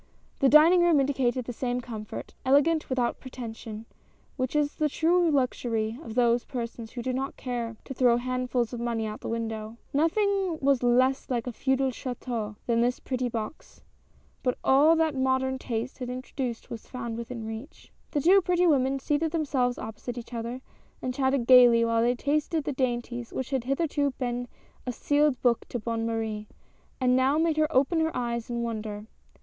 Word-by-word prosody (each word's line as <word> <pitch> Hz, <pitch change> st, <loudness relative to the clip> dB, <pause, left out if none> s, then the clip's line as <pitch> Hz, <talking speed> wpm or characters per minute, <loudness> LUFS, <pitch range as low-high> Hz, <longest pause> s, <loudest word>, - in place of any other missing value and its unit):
The 270 Hz, -, +4 dB
dining 325 Hz, +5 st, +7 dB
room 340 Hz, -4 st, +5 dB
indicated 260 Hz, -3 st, 0 dB
the 245 Hz, -, -5 dB
same 245 Hz, +1 st, -2 dB
comfort 225 Hz, -3 st, -7 dB
— -, -, -36 dB
ele 275 Hz, +2 st, +5 dB
gant 330 Hz, 0 st, 0 dB
without 250 Hz, -2 st, 0 dB
pretension, 225 Hz, -4 st, -8 dB, 0.5 s
which 255 Hz, +1 st, -2 dB
is 295 Hz, -1 st, +2 dB
the 305 Hz, -1 st, +1 dB
true 340 Hz, +3 st, +3 dB
luxury 240 Hz, -5 st, 0 dB
of 225 Hz, -7 st, -8 dB
those 240 Hz, -1 st, +3 dB
persons 235 Hz, -3 st, -6 dB
who 240 Hz, -, -5 dB
do 255 Hz, -, -1 dB
not 270 Hz, +2 st, -3 dB
care 235 Hz, -3 st, -4 dB
to -, -, -6 dB
throw 245 Hz, -2 st, +4 dB
handfuls 250 Hz, -1 st, -1 dB
of 240 Hz, -, -4 dB
money 235 Hz, -2 st, -1 dB
out 215 Hz, 0 st, -4 dB
of -, -, -28 dB
the -, -, -6 dB
window. 225 Hz, -1 st, -4 dB, 0.2 s
Nothing 375 Hz, +3 st, +1 dB
was 275 Hz, -2 st, +2 dB
less 255 Hz, +2 st, +2 dB
like 240 Hz, -3 st, -1 dB
a 250 Hz, -, -3 dB
feudal 265 Hz, +2 st, 0 dB
chS,teau 240 Hz, -4 st, -4 dB
than 235 Hz, -1 st, +2 dB
this 245 Hz, +1 st, +1 dB
pretty 255 Hz, -1 st, -2 dB
box, 225 Hz, +4 st, -7 dB, 0.6 s
but 250 Hz, -1 st, 0 dB
all 290 Hz, +5 st, +5 dB
that 320 Hz, -2 st, +2 dB
modern 260 Hz, 0 st, 0 dB
taste 240 Hz, +1 st, -4 dB
had 250 Hz, -1 st, -4 dB
introduced 255 Hz, -1 st, -5 dB
was 230 Hz, -, -7 dB
found 235 Hz, -3 st, -5 dB
within 235 Hz, 0 st, -6 dB
reach. 225 Hz, +7 st, -9 dB, 0.2 s
The 290 Hz, -, -1 dB
two 380 Hz, +6 st, +6 dB
pretty 360 Hz, 0 st, +2 dB
women 275 Hz, -4 st, +3 dB
seated 295 Hz, +4 st, 0 dB
themselves 270 Hz, -6 st, 0 dB
opposite 220 Hz, +3 st, -6 dB
each 240 Hz, 0 st, -8 dB
other, 235 Hz, +2 st, -4 dB, 0.4 s
and 255 Hz, -, -3 dB
chatted 265 Hz, -1 st, +1 dB
gayly 240 Hz, -2 st, +7 dB
while 230 Hz, 0 st, +2 dB
they 240 Hz, +2 st, +2 dB
tasted 300 Hz, +4 st, 0 dB
the 285 Hz, -, -2 dB
dainties 240 Hz, -2 st, -2 dB
which 260 Hz, 0 st, -4 dB
had 260 Hz, -3 st, -1 dB
hitherto 285 Hz, +1 st, 0 dB
been 245 Hz, -1 st, -2 dB, 0.4 s
a -, -, 0 dB
sealed 290 Hz, +1 st, +1 dB
book 240 Hz, -2 st, +2 dB
to -, -, -2 dB
Bonne 230 Hz, 0 st, -2 dB
Marie, 220 Hz, -2 st, -3 dB, 0.5 s
and 250 Hz, -1 st, +3 dB
now 265 Hz, +3 st, +3 dB
made 320 Hz, -1 st, +1 dB
her 310 Hz, 0 st, +2 dB
open 285 Hz, +4 st, +3 dB
her 320 Hz, 0 st, 0 dB
eyes 235 Hz, 0 st, -2 dB
in 235 Hz, -1 st, -2 dB
wonder. 215 Hz, -2 st, -4 dB
250 Hz, 185 wpm, -27 LUFS, 235-280 Hz, 0.6 s, dining